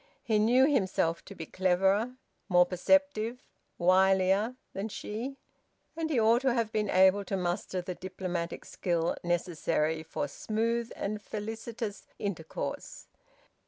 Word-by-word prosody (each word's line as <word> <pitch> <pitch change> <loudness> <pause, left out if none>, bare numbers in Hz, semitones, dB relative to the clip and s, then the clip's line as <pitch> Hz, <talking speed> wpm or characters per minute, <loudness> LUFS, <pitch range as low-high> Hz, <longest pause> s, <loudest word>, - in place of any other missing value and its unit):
He 220 -5 +2
knew 245 +5 +5
himself 190 - +1
to - - -10
be 160 - -6
cleverer, 190 +7 +1 0.3
more 180 -1 +6
perceptive, 235 +5 +2 0.4
wilier, 190 +5 +3 0.2
than 200 +3 -3
she; 235 +7 -5 0.6
and 325 -1 -2
he 280 -6 +2
ought 230 +2 +4
to 260 -2 +2
have 230 -2 0
been 210 -2 0
able 190 +2 +5
to 195 - -2
muster 180 +1 -2
the 180 - -4
diplomatic 180 -2 -4
skill 170 -2 -1
necessary 165 -2 0
for 160 - -3
smooth 230 +2 -1
and 210 +1 -3
felicitous 220 0 -5
intercourse. 170 -6 -5
200 Hz, 125 wpm, -30 LUFS, 180-230 Hz, 0.6 s, more